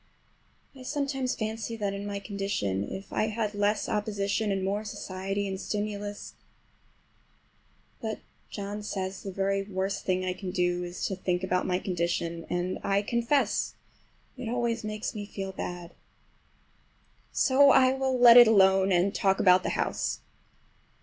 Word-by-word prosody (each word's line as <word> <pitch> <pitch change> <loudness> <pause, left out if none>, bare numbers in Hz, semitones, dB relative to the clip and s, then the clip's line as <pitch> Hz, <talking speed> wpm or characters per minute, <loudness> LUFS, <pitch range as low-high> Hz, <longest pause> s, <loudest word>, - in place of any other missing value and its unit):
I 260 - -12
sometimes 270 -1 -2
fancy 220 +1 -4
that 205 -3 -2
in 200 +1 -5
my 200 0 -3
condition 195 - -2
if 190 - -7
I 215 - +1
had 215 -1 -2
less 205 +1 0
opposition 205 0 -1
and 195 -1 -1
more 200 +2 -1
society 195 -1 -4
and 190 0 -4
stimulus—but 205 -1 -4 2.2
John 205 0 -5
says 190 -2 -4
the 195 - -6
very 195 +1 0
worst 195 0 -3
thing 185 0 0
I 185 - -1
can 185 0 -6
do 180 -1 0
is 175 0 -4
to 190 - -2
think 180 -1 -1
about 185 -1 0
my 180 -1 +1
condition, 170 -2 -2
and 180 +1 -2
I 200 +1 +1
confess 235 +5 0 0.6
it 250 -3 -5
always 235 -1 -1
makes 215 0 -4
me 205 -1 -6
feel 195 -2 -5
bad. 175 -2 -6 1.4
So 275 +2 +5
I 260 -1 +6
will 265 -1 0
let 240 -1 +9
it 240 -1 +10
alone 190 -2 +5
and 185 +3 +2
talk 195 -2 +1
about 185 -1 +6
the - - -2
house. - - -2
200 Hz, 150 wpm, -28 LUFS, 185-220 Hz, 2.2 s, it